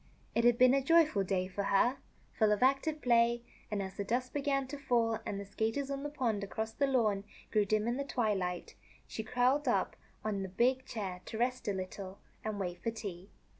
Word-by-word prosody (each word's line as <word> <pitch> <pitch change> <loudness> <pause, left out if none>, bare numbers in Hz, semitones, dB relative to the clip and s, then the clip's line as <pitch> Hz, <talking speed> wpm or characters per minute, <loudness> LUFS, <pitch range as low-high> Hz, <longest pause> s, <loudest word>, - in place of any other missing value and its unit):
It 230 - +2
had 240 -1 +5
been 255 +1 +6
a 275 - +3
joyful 310 -7 +4
day 185 -1 0
for 195 +2 -3
her, 235 +7 +3 0.4
full 215 -2 +3
of 210 +3 +2
active 275 +4 +2
play; 235 -1 +3 0.3
and, 205 -2 -1
as 190 0 -7
the 200 - -1
dusk 245 +5 -1
began 275 -1 0
to 290 0 -6
fall 230 -5 +1
and 200 - -3
the 200 - -6
skaters 225 +7 -2
on 275 0 -3
the 290 - -3
pond, 235 -8 -1
across 220 +3 -3
the 280 +4 +1
lawn, 220 -7 +2 0.3
grew 210 -1 +3
dim 215 +2 +1
in 240 +2 0
the 280 - -1
twilight, 200 -10 -1 0.3
she 220 - -5
curled 250 +5 +2
up - - +1 0.3
on 205 -2 -1
the 190 - -4
big 255 +7 +2
chair 190 -5 -4
to 220 - -6
rest 250 0 -1
a - - +2
little 190 +1 -6 0.3
and 215 -2 -3
wait 175 -2 -4
for - - 0
tea. 200 -4 -7
225 Hz, 210 wpm, -33 LUFS, 200-255 Hz, 0.4 s, been